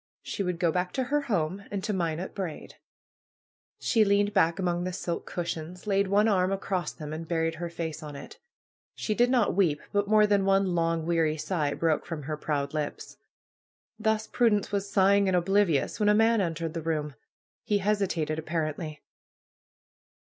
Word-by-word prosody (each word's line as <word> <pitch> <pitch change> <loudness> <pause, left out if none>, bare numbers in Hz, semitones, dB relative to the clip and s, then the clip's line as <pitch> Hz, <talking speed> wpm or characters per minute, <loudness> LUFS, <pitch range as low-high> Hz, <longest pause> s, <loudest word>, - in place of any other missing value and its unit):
She - - -4
would 180 -3 -1
go 170 -2 +2
back 180 +1 -1
to 260 - 0
her 290 +4 0
home 195 - -1
and 200 -2 -4
to 210 0 -1
Minot 170 -1 -2
Braid. 185 -6 -5 1.1
She 225 -3 +3
leaned 205 0 +2
back 170 -3 +3
among 175 -2 0
the 185 0 -3
silken 175 -2 -4
cushions, 170 0 -4
laid 200 -1 +2
one 205 +3 +3
arm 185 -3 +2
across 190 -4 -2
them, 155 -1 -7
and 160 +1 -6
buried 165 -1 0
her 170 - -2
face 160 -2 -5
on 150 -2 -8
it. 140 - -10 0.6
She 215 - -1
did 240 +3 +3
not 245 -5 +3
weep; 170 -6 +2
but 205 0 +1
more 215 0 +5
than 205 -1 +2
one 195 -1 +2
long, 165 -1 0
weary 165 -2 +1
sigh 150 -3 -1
broke 160 -2 0
from 160 -3 -5
her 155 +3 -3
proud 145 -2 -2
lips. 150 -2 -4 0.8
Thus 220 0 +1
Prudence 220 -4 +1
was 200 0 -1
sighing 200 0 +4
and 185 -1 +3
oblivious 185 -3 +2
when 210 -1 +3
a 210 - +5
man 225 0 +4
entered 165 -2 -2
the 165 - -3
room. 155 -2 -2 0.5
He 210 -3 +1
hesitated, 190 -6 0
apparently. 155 -1 -3
180 Hz, 180 wpm, -28 LUFS, 160-205 Hz, 1.1 s, more